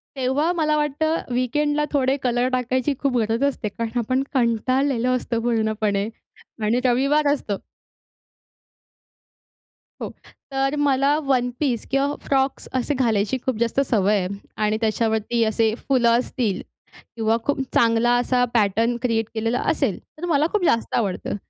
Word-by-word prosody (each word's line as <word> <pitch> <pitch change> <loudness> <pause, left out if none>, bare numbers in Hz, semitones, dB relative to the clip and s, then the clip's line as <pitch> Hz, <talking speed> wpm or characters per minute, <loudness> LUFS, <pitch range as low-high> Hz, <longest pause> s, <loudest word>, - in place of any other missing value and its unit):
तेव्हा 270 +5 +1
मला 305 -2 +1
वाटतं, 300 +2 0
वीकेंडला 295 +4 +1
थोडे 270 -1 +2
कलर 245 0 +1
टाकायची 255 +3 0
खूप 270 -3 0
गरज 225 +2 0
असते, 280 -5 0
कारण 230 +3 -3
आपण 255 +3 0
कंटाळलेलो 255 +1 +1
असतो 240 -2 -2
पूर्णपणे 220 -3 0 0.6
आणि 225 +4 +2
रविवार 275 +5 +3
असतो. 210 -8 -3 2.4
हो. - - -3 0.4
तर 270 +1 0
मला 280 0 +3
वन-पीस 250 -1 0
किंवा 275 +2 +1
फ्रॉक्स 270 0 0
असे 270 +4 -1
घालायची 230 -3 +1
खूप 260 -4 0
जास्त 235 +3 +1
सवय 210 -2 +3
आहे. 180 - -2 0.3
आणि 215 0 +1
त्याच्यावरती 220 +1 +1
असे 220 0 +1
फुलं 245 -2 +1
असतील 230 -6 -2 0.5
किंवा 225 0 +1
खूप 285 -1 0
चांगला 230 +1 +3
असा 245 0 +1
पॅटर्न 225 +2 +2
क्रिएट 230 -3 +1
केलेला 230 +2 -1
असेल, - - 0 0.2
तर 335 - -5
मला 305 -3 +2
खूप 420 -3 0
जास्त 230 -7 +1
आवडतं. 200 -4 -1
245 Hz, 135 wpm, -22 LUFS, 225-275 Hz, 2.4 s, रविवार